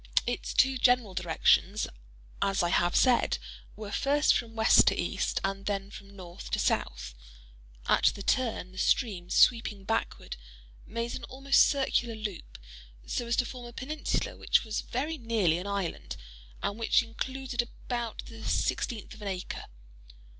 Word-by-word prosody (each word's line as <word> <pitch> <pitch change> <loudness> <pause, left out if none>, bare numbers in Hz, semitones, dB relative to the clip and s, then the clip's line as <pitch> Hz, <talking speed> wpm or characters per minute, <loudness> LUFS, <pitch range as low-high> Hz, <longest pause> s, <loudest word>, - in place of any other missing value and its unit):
Its 245 +1 -3
two 265 0 +4
general 245 -6 +3
directions, 185 +3 +2 0.5
as 195 -2 +2
I 175 - +1
have 175 0 +2
said, 250 -2 +4 0.4
were 210 -1 -7
first 290 +5 +3
from 230 -1 -3
west 220 0 +6
to - - +3
east, - - -1
and 195 +1 -3
then 200 -1 -2
from 200 -1 -12
north 175 -2 -9
to - - 0
south. - - -1 0.7
At - - +3
the 200 - +2
turn, 230 -8 0
the 190 - -9
stream, 190 -8 +1
sweeping 225 -4 +3
backward, 225 - -2 0.5
made 230 +2 -3
an 255 - -6
almost 275 +1 +3
circular 255 -4 0
loop, 215 -4 -6 0.5
so 240 - -3
as 235 - +1
to 250 - +2
form 245 0 -8
a 240 - -11
peninsula 295 +5 -2
which - - +2
was 220 -2 -2
very 300 +6 -3
nearly 215 -8 +1
an 185 - -6
island, 200 -4 -3 0.5
and 205 +3 -2
which 230 +2 +3
included 255 +2 -3
about 240 -1 -5
the 225 -1 -11
sixteenth 225 -5 -1
of 220 - -13
an 205 - -5
acre. 185 -2 -4
225 Hz, 155 wpm, -29 LUFS, 195-245 Hz, 0.7 s, west